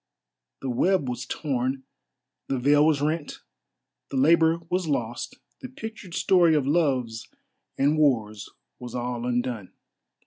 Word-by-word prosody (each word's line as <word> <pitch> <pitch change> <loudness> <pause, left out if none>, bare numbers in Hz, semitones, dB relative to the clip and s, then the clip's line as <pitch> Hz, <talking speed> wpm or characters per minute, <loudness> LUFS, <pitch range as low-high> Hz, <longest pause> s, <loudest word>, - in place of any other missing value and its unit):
The 135 - -2
web 180 +4 +2
was 125 0 -4
torn, 130 -2 -2 0.6
the 135 - -1
veil 145 +4 +4
was 150 -3 +2
rent, 155 0 -2 0.7
the 135 - -3
labour 165 +4 +4
was 180 -1 -1
lost, 120 -5 -2 0.2
the 255 - -8
pictured 220 -8 -8
story 175 -4 +4
of 145 -3 +1
loves 130 -7 0 0.5
and 145 +3 +2
wars 110 -8 +1 0.3
was 125 0 -8
all 120 0 -3
undone. 120 -5 -2
140 Hz, 130 wpm, -25 LUFS, 125-160 Hz, 0.7 s, veil